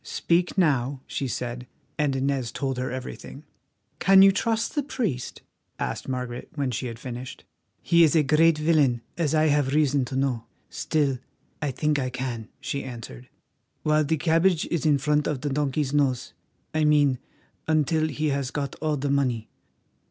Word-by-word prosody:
"Speak 175 Hz, +3 st, 0 dB
now," 140 Hz, -6 st, +1 dB
she 135 Hz, -, -3 dB
said; 125 Hz, +1 st, -4 dB, 0.3 s
and 145 Hz, -3 st, 0 dB
Inez 135 Hz, -3 st, -1 dB
told 135 Hz, -2 st, -2 dB
her 130 Hz, -, -2 dB
everything. 130 Hz, +2 st, -7 dB, 0.6 s
"Can 195 Hz, +1 st, +7 dB
you 195 Hz, -, +8 dB
trust 225 Hz, +3 st, 0 dB
the 295 Hz, -, +1 dB
priest?" 215 Hz, -, -3 dB, 0.3 s
asked -, -, -4 dB
Margaret, 125 Hz, -1 st, -4 dB
when 140 Hz, -3 st, -1 dB
she 125 Hz, +2 st, -3 dB
had 115 Hz, -1 st, -6 dB
finished. 125 Hz, +1 st, -7 dB, 0.4 s
"He 170 Hz, -1 st, +5 dB
is 160 Hz, 0 st, +4 dB
a 155 Hz, -, +5 dB
great 155 Hz, +3 st, +4 dB
villain, 150 Hz, -6 st, +2 dB
as 160 Hz, -3 st, 0 dB
I 155 Hz, 0 st, +4 dB
have 145 Hz, -1 st, +2 dB
reason 145 Hz, -3 st, +3 dB
to 130 Hz, -, -6 dB
know; 130 Hz, -4 st, 0 dB, 0.3 s
still, 140 Hz, -5 st, 0 dB, 0.4 s
I 150 Hz, -, 0 dB
think 150 Hz, +3 st, 0 dB
I 130 Hz, -1 st, -1 dB
can," 125 Hz, -3 st, -5 dB
she 140 Hz, -, -3 dB
answered, 115 Hz, -, -9 dB, 0.5 s
"while 155 Hz, 0 st, +3 dB
the 160 Hz, +2 st, 0 dB
cabbage 165 Hz, +2 st, +2 dB
is 165 Hz, -2 st, 0 dB
in 145 Hz, -2 st, +4 dB
front 150 Hz, +2 st, +1 dB
of 145 Hz, -4 st, -2 dB
the 145 Hz, -, -2 dB
donkey's 145 Hz, 0 st, -1 dB
nose—I 145 Hz, +2 st, -2 dB
mean 145 Hz, -4 st, +4 dB, 0.5 s
until 155 Hz, 0 st, +2 dB
he 155 Hz, 0 st, -1 dB
has 140 Hz, -2 st, -1 dB
got 140 Hz, -1 st, -3 dB
all 155 Hz, -1 st, 0 dB
the 140 Hz, +1 st, -1 dB
money. 125 Hz, -6 st, 0 dB
140 Hz, 165 wpm, -25 LUFS, 130-155 Hz, 0.6 s, you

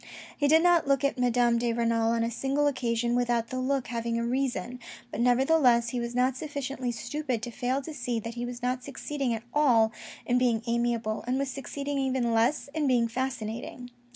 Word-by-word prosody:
He 290 Hz, -, +1 dB
did 320 Hz, +3 st, +5 dB
not 350 Hz, -4 st, +4 dB
look 275 Hz, 0 st, +2 dB
at 280 Hz, -2 st, 0 dB
Madame 240 Hz, -1 st, +3 dB
de 235 Hz, 0 st, 0 dB
Renal 230 Hz, -1 st, +1 dB
on 230 Hz, 0 st, +1 dB
a 230 Hz, -, -1 dB
single 275 Hz, +5 st, 0 dB
occasion 240 Hz, -3 st, 0 dB
without 240 Hz, -2 st, +1 dB
that 255 Hz, -, -3 dB
look 265 Hz, 0 st, 0 dB
having 230 Hz, -1 st, -2 dB
a 235 Hz, -, -1 dB
reason, 250 Hz, -2 st, -2 dB, 0.3 s
but 215 Hz, -, -3 dB
nevertheless 245 Hz, -1 st, +4 dB
he 245 Hz, -, -2 dB
was 235 Hz, 0 st, -4 dB
not 250 Hz, +1 st, +2 dB
sufficiently 275 Hz, -3 st, -4 dB
stupid 255 Hz, 0 st, -3 dB
to 240 Hz, -, -4 dB
fail 255 Hz, +3 st, -1 dB
to 315 Hz, -, -7 dB
see 245 Hz, -4 st, -2 dB
that 230 Hz, +1 st, -6 dB
he 240 Hz, 0 st, -5 dB
was 245 Hz, 0 st, -6 dB
not 250 Hz, 0 st, -1 dB
succeeding 280 Hz, -1 st, -3 dB
at 225 Hz, -1 st, -3 dB
all 240 Hz, -7 st, +4 dB, 0.3 s
in 245 Hz, 0 st, +2 dB
being 235 Hz, -3 st, +1 dB
amiable, 235 Hz, -2 st, -1 dB
and 255 Hz, +1 st, +1 dB
was 275 Hz, 0 st, -1 dB
succeeding 280 Hz, +1 st, -4 dB
even 260 Hz, -3 st, 0 dB
less 235 Hz, +8 st, +2 dB
in 305 Hz, -2 st, 0 dB
being 240 Hz, -3 st, +3 dB
fascinating. 245 Hz, 0 st, -4 dB
245 Hz, 200 wpm, -28 LUFS, 235-270 Hz, 0.3 s, did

